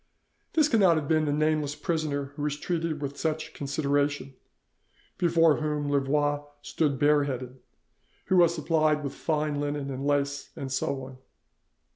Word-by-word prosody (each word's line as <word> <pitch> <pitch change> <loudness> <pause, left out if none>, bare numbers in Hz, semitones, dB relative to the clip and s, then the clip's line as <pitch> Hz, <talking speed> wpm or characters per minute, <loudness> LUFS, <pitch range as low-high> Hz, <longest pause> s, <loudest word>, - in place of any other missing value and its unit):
This 310 -2 +4
cannot 200 - +4
have 150 -2 -2
been 155 0 +2
the 145 - 0
nameless 150 -1 +1
prisoner 145 -5 -2
who 145 - -6
was 145 0 -1
treated 165 -2 -2
with 140 0 -4
such 160 0 -2
consideration, 145 -1 -1 0.9
before 165 -3 +4
whom 150 -2 -2
Louvois 145 +1 +1 0.2
stood 145 -4 0
bare 145 0 +4
headed, 130 -1 -5 0.7
who 190 - +2
was 170 -1 +5
supplied 155 -1 +1
with 140 - -4
fine 150 -2 -1
linen 145 -1 -3
and 135 +1 -5
lace, 145 0 0
and 135 -1 -6
so 135 0 -1
on. 130 0 -10
145 Hz, 150 wpm, -27 LUFS, 140-155 Hz, 0.9 s, was